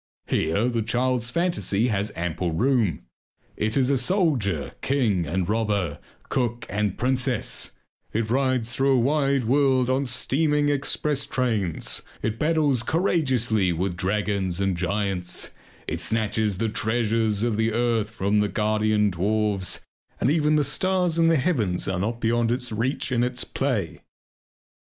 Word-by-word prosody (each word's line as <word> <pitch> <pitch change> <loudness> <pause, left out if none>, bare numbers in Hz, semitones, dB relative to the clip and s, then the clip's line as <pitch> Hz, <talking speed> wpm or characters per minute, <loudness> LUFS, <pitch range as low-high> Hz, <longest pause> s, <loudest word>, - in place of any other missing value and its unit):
Here 80 +9 0
the 120 -2 0
child's 120 +1 0
fantasy 125 - +1
has 105 -1 -1
ample 85 0 -2
room. 115 - +1 0.5
It 110 +3 -1
is 135 0 +3
a 140 - +3
soldier, 125 - 0
king, 110 -11 +1
and 90 +2 -1
robber, 105 -8 -1 0.3
cook, 120 -2 -1
and 105 -1 -1
princess; 125 -1 -1 0.4
it 110 0 -1
rides 130 -3 +1
through 135 +2 +2
a - - +3
wide 140 +1 +2
world 130 0 +2
on 135 +1 0
steaming 145 +4 +1
express 145 0 0
trains, 110 -10 -1 0.2
it 110 +1 -2
battles 150 -5 +2
courageously 125 - +1
with 90 +2 -2
dragons 95 -1 -1
and 95 -2 +1
giants, 90 0 -1 0.4
it - - -3
snatches 110 -2 0
the 115 +3 0
treasures 110 -1 0
of 120 -2 +1
the 110 +1 +1
earth 115 -2 0
from 105 -2 0
their 105 0 +1
guardian 105 -1 +1
dwarfs, 100 +1 0 0.4
and 135 - +2
even 155 -1 +2
the 150 - +3
stars 180 +3 +1
in 165 - +4
the 165 - +4
heavens 120 - 0
are 95 -2 -1
not 115 +5 -2
beyond 115 0 +1
its 125 0 -1
reach 120 +5 -2
in 120 -2 +2
its 125 +1 0
play. 120 - -2
115 Hz, 145 wpm, -24 LUFS, 105-130 Hz, 0.5 s, in